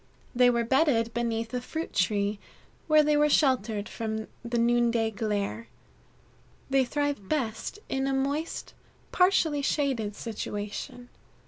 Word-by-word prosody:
They 250 0 +5
were 235 -1 +1
bedded 235 -3 +2
beneath 230 -1 -2
a 250 - -1
fruit 320 +6 -5
tree, 200 +1 +1 0.5
where 310 -1 +6
they 300 0 +3
were 295 0 +4
sheltered 230 -8 +2
from 220 -1 -4 0.2
the 240 0 -2
noonday 235 -1 +2
glare. 210 +1 -2 1.0
They 270 -1 +4
thrive 285 -6 -2
best 250 - -2
in 270 0 -1
a 270 - 0
moist, 280 +4 -2 0.4
partially 345 -6 +3
shaded 265 -8 0
situation. 215 +2 -5
240 Hz, 125 wpm, -28 LUFS, 220-280 Hz, 1.0 s, where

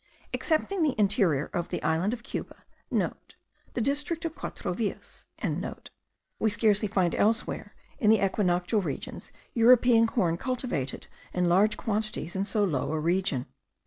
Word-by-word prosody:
Excepting 340 +4 0
the 295 -7 +1
interior 195 - +2
of 175 0 -2
the - - -4
island 160 +6 +1
of 240 0 -5
Cuba,* - - -6
(* - - -39
The - - +1 0.7
district 295 +6 -1
of 325 - -2
Quatro - - -5
Villas.) - - -5 1.1
we 220 - +3
scarcely 210 0 +3
find 190 -4 +1
elsewhere 225 +2 0 0.2
in 215 -6 +3
the 220 - +7
equinoctial 185 +1 +1
regions - - -5 0.2
European 235 -1 +6
corn 175 -8 +1
cultivated 240 - -3 0.3
in 180 -1 +2
large 200 +5 +4
quantities 215 -6 -2
in 195 +1 0
so 210 0 +1
low 150 -8 0
a 160 - -1
region. 170 -5 0
210 Hz, 145 wpm, -28 LUFS, 175-235 Hz, 1.1 s, the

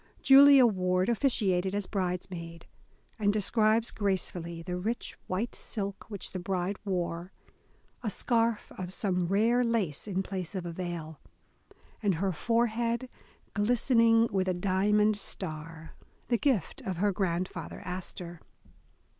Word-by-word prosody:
Julia 275 -1 +8
Ward 185 -3 +1
officiated 200 -7 +1
as 205 -1 -1
bridesmaid, 180 -3 -4 0.5
and 205 -1 +3
describes 215 +2 +2
gracefully 175 -4 -2
the 180 +1 -4
rich 220 +7 -3
white 200 +6 -2
silk 200 -3 -5
which 205 -3 -6
the 185 - -4
bride 185 +2 -2
wore, 180 -2 -3 0.7
a 225 - -2
scarf 230 +1 +1
of 180 -1 -4
some 180 -3 0
rare 225 +6 +3
lace 215 - -1
in 190 -1 -1
place 185 -1 -5
of 185 -2 -3
a 170 - -4
veil, 165 -3 -5 0.8
and 200 -4 +2
her 190 +4 0
forehead 235 +6 0 0.4
glistening 230 +1 +4
with 190 -1 0
a 185 - +1
diamond 205 +3 +2
star, 160 -4 -5 0.4
the 240 - +3
gift 250 - 0
of 185 -3 -4
her 205 +3 +2
grandfather 185 -2 -3
Astor. 180 -2 -6
195 Hz, 130 wpm, -29 LUFS, 180-225 Hz, 0.8 s, Julia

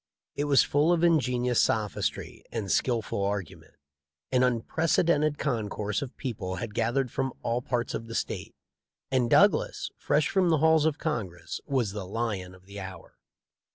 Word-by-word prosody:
It 145 - -1
was 140 -2 +5
full 150 +4 +2
of 170 -1 +2
inge 165 -6 +4
nious 125 -1 0
sophistry 110 -2 0
and 105 -5 -3
skilful 115 -5 0
argument. 100 -4 -4 0.6
An 130 -1 +3
unprec 125 +6 +1
edented 155 -2 +2
concourse 105 -6 -2
of 140 -2 -7
people 105 -8 -4
had 105 +3 -5
gathered 120 +3 0
from 130 -1 -2
all 120 +1 0
parts 120 -1 -2
of 115 - -4
the 115 - -6
State, - - -3 0.6
and 125 -3 +2
Douglas, - - +3
fresh 150 - +2
from 185 -3 +2
the 160 - +4
halls 160 0 +4
of 160 -1 +1
Congress, 105 - -4
was 130 -8 0
the 100 -2 -6
lion 100 -4 -3
of 95 0 -20
the 100 +1 -9
hour. 95 -2 -10
120 Hz, 165 wpm, -28 LUFS, 105-145 Hz, 0.6 s, was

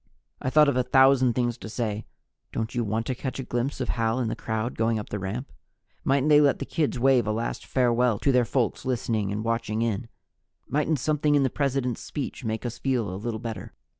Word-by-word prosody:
I - - 0
thought 150 +2 +6
of 140 - +2
a 125 - +3
thousand 130 0 +5
things 120 0 -1
to - - -8
say: 110 -2 -3 0.4
Don't 115 +1 -3
you 120 -1 0
want 110 +2 -1
to 130 - -1
catch 130 +1 -5
a 135 - -3
glimpse 120 +2 -2
of - - -2
Hal 115 +1 0
in 120 -3 0
the - - -2
crowd 110 +2 -3
going 115 0 +1
up 105 - -6
the 105 - -3
ramp? 105 +8 -4 0.5
Mightn't 135 +1 +2
they 150 -1 +7
let 140 -2 +4
the - - -4
kids 150 -5 -1
wave 130 -2 +3
a - - +1
last 115 +2 -3
farewell 125 -3 +2
to 135 - +2
their 125 -1 +4
folks 120 0 -1
listening 115 -5 -1
and 105 +1 -2
watching 115 -1 0
in? 115 0 -2 0.6
Mightn't 150 +3 +1
something 150 +2 +1
in 140 - +4
the 130 - +1
President's 135 -4 -1
speech 140 -2 -5
make 110 +1 -3
us 120 -1 -4
feel 120 -8 0
a 95 - -6
little 115 -1 -3
better? 115 -1 -6
120 Hz, 225 wpm, -26 LUFS, 110-135 Hz, 0.6 s, they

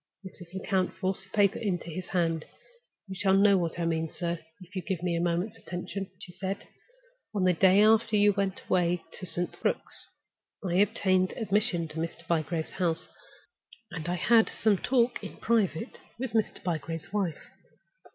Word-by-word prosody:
Mrs. 180 -1 -11
Lecount 190 -1 0
forced 190 0 0
the - - -23
paper 205 +1 +3
into 180 -5 -2
his 185 +3 -5
hand. 165 -3 0 0.6
"You 190 - -6
shall 190 0 +3
know 200 0 +6
what 170 -3 0
I 170 - -1
mean, 160 -1 0
sir, 170 0 -3 0.2
if 180 0 -14
you 185 - -1
will - - -24
give 185 -4 -2
me 175 -2 +1
a 170 - 0
moment's 175 +6 -1
attention," 185 +2 -5
she 180 - -10
said. 190 +3 -4 0.7
"On 195 - +1
the 185 -1 +5
day 190 +4 +6
after 220 0 +4
you 205 0 +5
went 195 -1 -1
away 175 -1 +2 0.2
to 185 - -6
St. 175 +1 -1
Crux, - - 0 0.6
I 175 0 +1
obtained 190 -2 +3
admission 205 -5 +1
to 155 - -9
Mr. 165 +1 -5
Bygrave's 160 -1 -1
house, 165 -1 0 0.8
and 165 -1 -4
I 175 - +1
had 225 +4 +4
some 210 -4 +2
talk 245 -1 +1
in - - -7
private 220 -2 0 0.2
with 255 0 -3
Mr. 220 -1 0
Bygrave's 165 +1 -3
wife. 195 -6 -2
185 Hz, 175 wpm, -29 LUFS, 170-205 Hz, 0.8 s, know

